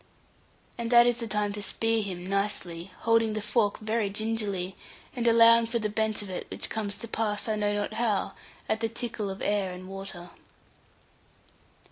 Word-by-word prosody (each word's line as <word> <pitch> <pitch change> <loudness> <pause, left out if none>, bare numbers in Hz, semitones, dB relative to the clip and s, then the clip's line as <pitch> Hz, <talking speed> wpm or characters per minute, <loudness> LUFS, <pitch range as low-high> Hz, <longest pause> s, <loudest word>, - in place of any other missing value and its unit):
And 235 -1 -2
that 240 0 +8
is 240 -1 +2
the 230 - -3
time 210 -1 0
to 205 - -5
spear 225 +2 +1
him 185 -3 -5
nicely, 195 -3 -2
holding 230 -1 +3
the 215 - -1
fork 210 -1 +1
very 215 -1 -1
gingerly, 205 -3 -2 0.4
and 240 -1 0
allowing 230 0 +7
for 235 +1 -1
the 215 -2 -1
bent 215 0 -1
of 200 - -9
it, 185 - -5
which - - -4
comes 205 -2 -2
to 230 - -7
pass, 215 -1 -1
I 220 - +1
know 205 -1 +1
not 205 +1 -2
how, 220 -3 0 0.3
at 220 - 0
the 225 0 0
tickle 225 -3 -3
of 190 +1 -6
air 205 -2 +1
and 180 +1 -8
water. 190 -2 -7
215 Hz, 180 wpm, -28 LUFS, 200-225 Hz, 0.4 s, that